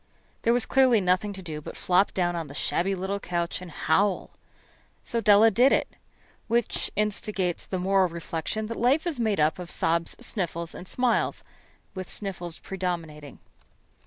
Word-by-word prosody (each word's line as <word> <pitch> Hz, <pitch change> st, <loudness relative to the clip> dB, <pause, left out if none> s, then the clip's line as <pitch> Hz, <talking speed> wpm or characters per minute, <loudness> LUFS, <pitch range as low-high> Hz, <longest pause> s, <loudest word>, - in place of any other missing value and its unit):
There 230 Hz, -, +3 dB
was 240 Hz, -1 st, +2 dB
clearly 260 Hz, -4 st, +4 dB
nothing 185 Hz, +2 st, +1 dB
to 190 Hz, -1 st, -8 dB
do 155 Hz, -3 st, -6 dB
but -, -, -9 dB
flop 185 Hz, +2 st, +3 dB
down 175 Hz, -2 st, +1 dB
on 165 Hz, -2 st, -3 dB
the 140 Hz, -, -10 dB
shabby 195 Hz, +5 st, 0 dB
little 190 Hz, +2 st, -3 dB
couch 175 Hz, -2 st, -2 dB
and 180 Hz, -, -8 dB
howl. 195 Hz, +4 st, +1 dB, 0.7 s
So 235 Hz, -, -1 dB
Della 215 Hz, +1 st, +6 dB
did 250 Hz, +6 st, +5 dB
it. -, -, +2 dB, 0.6 s
Which 235 Hz, 0 st, 0 dB
instigates 205 Hz, -3 st, -1 dB
the 190 Hz, -, -2 dB
moral 190 Hz, 0 st, +2 dB
reflection 170 Hz, +5 st, -3 dB
that 230 Hz, +1 st, -5 dB
life 265 Hz, +8 st, +3 dB
is 325 Hz, -7 st, -2 dB
made 220 Hz, -5 st, +1 dB
up 155 Hz, +4 st, +2 dB
of 175 Hz, -1 st, -7 dB
sobs, 165 Hz, 0 st, 0 dB
sniffles, 170 Hz, -8 st, -3 dB
and 180 Hz, -, -9 dB
smiles, 250 Hz, +2 st, +1 dB, 0.5 s
with 185 Hz, -2 st, -7 dB
sniffles 180 Hz, -4 st, -4 dB
predominating. 165 Hz, -6 st, -5 dB
190 Hz, 160 wpm, -26 LUFS, 170-215 Hz, 0.7 s, Della